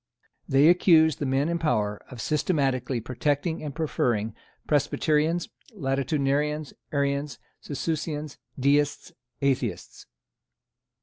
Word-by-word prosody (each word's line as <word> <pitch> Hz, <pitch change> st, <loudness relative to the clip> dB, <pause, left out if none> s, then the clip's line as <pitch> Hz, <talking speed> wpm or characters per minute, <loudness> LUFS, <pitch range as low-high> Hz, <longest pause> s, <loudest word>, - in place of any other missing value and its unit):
They 135 Hz, +3 st, +5 dB
accused 165 Hz, -3 st, +5 dB
the 145 Hz, -, -1 dB
men 135 Hz, +3 st, +1 dB
in 170 Hz, 0 st, -1 dB
power 105 Hz, -9 st, 0 dB
of 125 Hz, -3 st, -8 dB
systematically 135 Hz, -5 st, 0 dB
protecting 145 Hz, +7 st, -1 dB
and 145 Hz, -3 st, -5 dB
preferring 120 Hz, -9 st, 0 dB, 0.3 s
Presbyterians, 150 Hz, +3 st, +1 dB, 0.3 s
Latitudinarians, 140 Hz, 0 st, 0 dB, 0.2 s
Arians, 140 Hz, 0 st, -1 dB, 0.2 s
Socinians, 150 Hz, 0 st, -4 dB, 0.2 s
Deists, 145 Hz, +2 st, +1 dB, 0.3 s
Atheists. 135 Hz, -2 st, -2 dB
145 Hz, 95 wpm, -26 LUFS, 135-155 Hz, 0.3 s, They